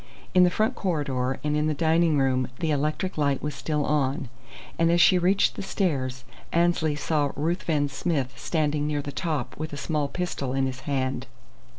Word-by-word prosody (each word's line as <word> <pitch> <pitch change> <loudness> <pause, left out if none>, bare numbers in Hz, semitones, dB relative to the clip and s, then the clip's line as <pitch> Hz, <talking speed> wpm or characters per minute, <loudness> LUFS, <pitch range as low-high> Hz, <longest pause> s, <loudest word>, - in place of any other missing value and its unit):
In 180 - +7
the 180 - +5
front 215 +7 +1
corridor 140 - -1
and 150 0 0
in 150 0 +1
the 155 - 0
dining 165 0 +3
room 130 -2 +2
the 160 -2 -1
electric 155 +5 -1
light 140 -2 +1
was 150 0 -2
still 150 -2 -1
on; 140 -1 0 0.5
and 165 0 +4
as 170 - +3
she 180 +1 +6
reached 190 +3 +3
the - - -5
stairs 135 - -1 0.3
Annesley 170 -3 +2
saw 150 -1 0
Ruthven 155 -1 0
Smith 140 -2 -2
standing 150 -2 0
near 145 -1 -1
the 145 - -5
top 145 -5 -3
with 155 -1 -4
a - - -4
small 150 -1 -1
pistol 140 -6 -3
in 135 0 +1
his 130 0 -4
hand. 130 -2 -1
150 Hz, 185 wpm, -26 LUFS, 135-170 Hz, 0.5 s, In